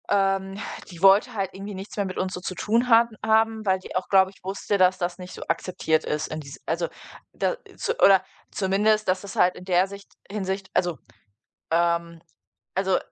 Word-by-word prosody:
Ähm, 195 -1 +1 0.3
die 175 -2 -11
wollte 200 +6 +6
halt 195 -3 -2
irgendwie 195 +1 -7
nichts 195 +2 -8
mehr 205 - 0
mit 185 - -6
uns 185 0 -1
so - - -4
zu 185 - -5
tun 230 +7 +1
haben 230 -1 +5
haben, 220 0 +2
weil 190 -1 +2
die 185 - -10
auch, 185 - -1
glaube 190 -1 +5
ich, - - -24
wusste, 195 +2 -1
dass 185 0 +4
das 175 0 -2
nicht 180 0 -9
so - - -7
akzeptiert 160 -3 0
ist 150 +1 -2
in 155 - -5
dies 140 -2 -10
also 170 +1 -1 0.5
da - - 0 0.2
so 465 - -1
oder 195 -1 +6 0.3
zumindest, 210 +2 +1
dass 185 0 +1
das 200 -1 -9
halt 180 0 +3
in 180 - -11
der 185 0 +3
Sicht 200 0 -12 0.2
Hinsicht 195 -1 -3
also, 175 -3 +1 0.7
ähm 170 0 +1 0.5
also, 190 0 +2
190 Hz, 195 wpm, -25 LUFS, 180-200 Hz, 0.7 s, wollte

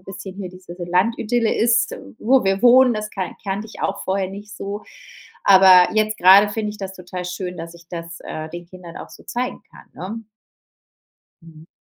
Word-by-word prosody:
bisschen 190 0 -9
hier 195 -2 -6
diese 180 -1 -12
so 175 - -6
Landidylle 225 +5 +1
ist, 235 +1 +2 0.2
wo 255 +2 +3
wir 195 +2 0
wohnen, 250 0 +6
das 215 0 -4
kan 190 -3 -5
kannte 200 +2 -3
ich 215 - -10
auch - - -2
vorher 190 0 -1
nicht 200 +1 -10
so. 205 +1 -5 0.6
Aber 190 -2 +7
jetzt 215 0 +1
grade 195 +3 +7
finde 210 0 -3
ich 210 - -11
das 195 -1 -6
total 180 -1 -7
schön, 180 0 -5
dass 165 +1 -8
ich 170 0 -16
das, 170 -1 -7
äh, 155 0 -6
den 175 +2 -8
Kindern 175 -1 -12
auch - - -9
so - - -15
zeigen 250 +1 -4
kann, - - -16
ne? 220 +5 -7 1.2
Mhm. 160 -1 -15
195 Hz, 190 wpm, -21 LUFS, 180-215 Hz, 1.2 s, Aber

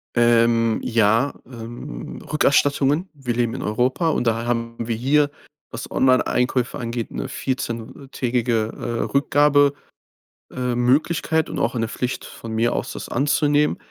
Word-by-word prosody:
Ähm, 115 -1 +3
ja, 115 +3 +2
ähm, 115 - -8
Rückerstattungen. 145 +3 +2
Wir 135 -5 -3
leben 120 -2 0
in 130 - -5
Europa 125 +9 0
und 125 - 0
da 115 0 0
haben 115 -1 -2
wir 115 -1 -2
hier, 145 +5 +2 0.4
was - - -7
Onlineeinkäufe 125 -1 +1
angeht, 115 -1 -4
'ne - - -4
14- 125 +1 -4
Tägige, 120 -3 0
äh, 120 -1 -3
Rückgabe 145 0 +4 0.8
ähm, 125 -1 -2
Möglichkeit 160 +3 +1
und - - -4
auch - - 0
eine 115 -1 0
Pflicht, 125 +3 -3
von 115 - -9
mir 115 +2 +1
aus, - - -3
das - - -7
anzunehmen. 145 +2 +2
125 Hz, 140 wpm, -22 LUFS, 115-140 Hz, 0.8 s, Rückgabe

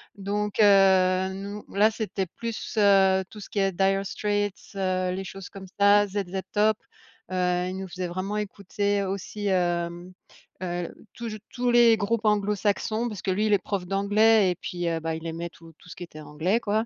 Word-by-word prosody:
donc 205 +1 -3
heu, 190 -2 +5
nous 200 +2 -6
là 210 +2 +4
c'était 210 -3 -3
plus, 230 +6 -6
heu, 195 -2 +5
tout 210 - -11
ce 200 - -10
qui 205 - -2
est 195 0 +2
Dire 195 +2 +1
Streets, 205 0 -2
heu, 185 -1 0
les 190 +1 -4
choses 195 0 -9
comme 190 -1 -10
ça. 205 +1 +6
ZZ 195 -1 -3
Top, 215 0 +3 0.5
heu, 180 -1 +1
il 185 - -5
nous 190 0 -5
faisait 180 0 -4
vraiment 185 +4 -3
écouter 205 0 -1
aussi, 200 +2 -4
hem 175 -1 -1 0.5
heu, 175 -1 -3 0.2
toujou 230 -2 -6 0.2
tous 245 -1 0
les 235 -2 +6
groupes 220 +2 -1
anglo-saxons, 210 +2 +1
parce 205 -4 -7
que - - -3
lui 205 +4 +1
il 215 - +2
est - - +6
prof 190 -1 -3
d'anglais 205 +1 +4
et - - -3
puis, 175 0 -3
heu, 165 -1 -1
bah 160 0 -3
il 160 +1 -6
aimait 165 +1 -4
tout 165 -1 -16
tout - - -17
ce - - -9
qui 175 - -8
était 155 -3 -10
anglais 160 +9 0
quoi 220 0 0
195 Hz, 190 wpm, -26 LUFS, 185-210 Hz, 0.5 s, ça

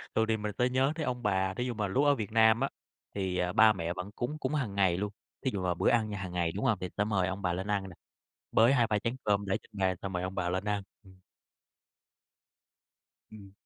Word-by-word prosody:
thường 110 - +3
thì 110 0 +1
mình 105 0 -3
sẽ 125 +1 +2
nhớ 130 +3 +2
tới 160 - -2
ông 125 -1 -3
bà, 95 -2 +1
thí 125 +5 -2
dụ 125 - -2
mà 105 -2 -1
lúc 135 +9 +1
ở 145 -1 +5
Việt 110 -3 -4
Nam 110 0 +5
á 135 - 0 0.5
thì, 95 -2 -1
ờ, 90 0 0
ba 110 0 +7
mẹ 85 -2 -3
vẫn 95 +3 -6
cúng 145 +5 -3
cúng 155 - -2
hằng 115 -9 -2
ngày 95 -3 +3
luôn. 105 +1 -2 0.3
Thí 130 - +2
dụ 95 -2 -2
là 90 - +1
bữa 85 - +2
ăn 110 -3 +2
nhà 105 - -4
hằng 95 -2 -5
ngày, 85 -2 0
đúng 105 +8 -3
hông, 115 -6 +3
thì 90 - -3
sẽ 105 - +3
mời 95 -4 +1
ông 95 +1 -4
bà 90 -2 0
lên 95 +3 -3
ăn 105 -2 0
nè, 85 - -12 0.6
bới 115 +4 +5
2-3 115 -5 +2
chén 115 +4 -2
cơm 100 -1 +1
để 95 - +1
trên - - -22
bàn 95 -1 +1
xong 95 -1 -4
mời 90 - -2
ông 95 +1 -4
bà 90 -2 -1
lên 95 +2 -1
ăn. 105 -1 -1 0.2
Ừm. 95 -1 -18 2.1
Ừm. 100 -3 -12
100 Hz, 260 wpm, -30 LUFS, 95-115 Hz, 2.1 s, ba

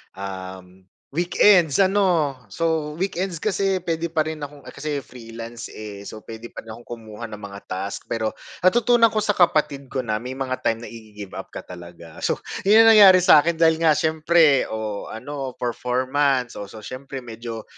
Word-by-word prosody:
um, 95 -1 -8 0.2
weekends 175 +1 +3
ano? 185 -7 +3 0.2
So, 160 - -1
weekends 185 -2 -2
kasi 195 0 0
puwede 170 -1 -3
pa 155 -2 +1
rin 155 -1 -5
akong 145 0 -8
kasi 150 -1 -4
freelance, 115 -1 -9
eh. 105 -2 -8
So, 110 - -8
puwede 115 +1 -9
pa - - -9
rin 115 - -10
akong 120 - -14 0.2
kumuha 110 +1 -9
ng 105 - -8
mga 100 -1 -9
task, 95 +2 -5
pero 110 -1 -1 0.2
natutunan 235 +5 +4
ko 215 -1 -1
sa 210 - +2
kapatid 150 -7 +1
ko 130 0 -3
na 110 -2 -2
may 125 +3 -6
mga 130 -1 -3
time 115 +1 0
na - - -8
igi-give-up 105 -4 -9
ka - - -7
talaga. 85 -2 -12
So, - - 0 0.3
'yon 220 +3 +8
'yong 225 - +7
nangyari 195 -3 +9
sa 180 -4 +8
akin 170 +3 0
dahil 160 -1 +3
nga 155 -2 +5
siyempre 160 -2 +3
o 110 -2 -5
ano, 135 +2 -6
performance 130 +2 0
o 100 - -6
so, 110 +2 -12
siyempre 130 +2 -7
medyo 115 -1 -7
135 Hz, 175 wpm, -23 LUFS, 110-165 Hz, 0.3 s, nangyari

